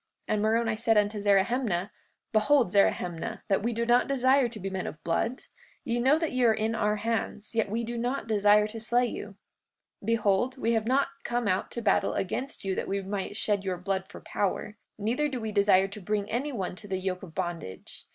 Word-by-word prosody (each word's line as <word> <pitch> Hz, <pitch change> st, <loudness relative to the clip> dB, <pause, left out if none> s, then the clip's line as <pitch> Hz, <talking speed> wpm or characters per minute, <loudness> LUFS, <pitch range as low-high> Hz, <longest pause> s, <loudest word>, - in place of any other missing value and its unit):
And 215 Hz, -1 st, +1 dB
Moroni 225 Hz, +1 st, +1 dB
said 225 Hz, 0 st, +3 dB
unto 205 Hz, 0 st, +1 dB
Zerahemnah: 200 Hz, -1 st, +2 dB, 0.4 s
Behold, 230 Hz, 0 st, +4 dB
Zerahemnah, 195 Hz, +1 st, +1 dB
that 195 Hz, -, +2 dB
we 235 Hz, +3 st, 0 dB
do 235 Hz, 0 st, -1 dB
not 240 Hz, +1 st, +4 dB
desire 265 Hz, -1 st, +3 dB
to 225 Hz, -2 st, -9 dB
be 195 Hz, -, -4 dB
men 190 Hz, -1 st, -3 dB
of -, -, -6 dB
blood. 225 Hz, +9 st, -1 dB, 0.4 s
Ye 235 Hz, 0 st, -1 dB
know 265 Hz, +5 st, +4 dB
that 325 Hz, -1 st, -1 dB
ye 255 Hz, -1 st, 0 dB
are 225 Hz, -2 st, +5 dB
in 220 Hz, +1 st, -1 dB
our 210 Hz, -1 st, +1 dB
hands, 215 Hz, 0 st, -3 dB
yet 225 Hz, -3 st, +1 dB
we 230 Hz, +3 st, -1 dB
do 235 Hz, +1 st, -4 dB
not 250 Hz, +4 st, -2 dB
desire 210 Hz, -1 st, +4 dB
to 225 Hz, +1 st, -6 dB
slay 240 Hz, +2 st, +2 dB
you. 210 Hz, -3 st, -6 dB, 0.7 s
44:2 -, -, -11 dB
Behold, 230 Hz, +3 st, +2 dB
we 230 Hz, -, 0 dB
have 225 Hz, -1 st, 0 dB
not 270 Hz, +3 st, +2 dB
come 240 Hz, -2 st, -1 dB
out 185 Hz, -1 st, 0 dB
to 235 Hz, -, -5 dB
battle 215 Hz, -, +2 dB
against 255 Hz, +6 st, -3 dB
you 190 Hz, -, 0 dB
that -, -, -3 dB
we 195 Hz, 0 st, -2 dB
might 195 Hz, 0 st, -4 dB
shed 205 Hz, -2 st, 0 dB
your 185 Hz, -2 st, -2 dB
blood 190 Hz, +1 st, -2 dB
for -, -, -11 dB
power; 205 Hz, +1 st, -2 dB, 0.2 s
neither 240 Hz, +8 st, 0 dB
do 260 Hz, -3 st, -4 dB
we 220 Hz, -1 st, -3 dB
desire 200 Hz, -2 st, +4 dB
to 205 Hz, +1 st, -9 dB
bring 205 Hz, +1 st, -1 dB
any 265 Hz, +6 st, -1 dB
one 190 Hz, -8 st, -3 dB
to 205 Hz, -, -10 dB
the 190 Hz, -1 st, -2 dB
yoke 185 Hz, -1 st, -3 dB
of 170 Hz, -4 st, -11 dB
bondage. 175 Hz, -, -5 dB
215 Hz, 215 wpm, -28 LUFS, 195-235 Hz, 0.7 s, are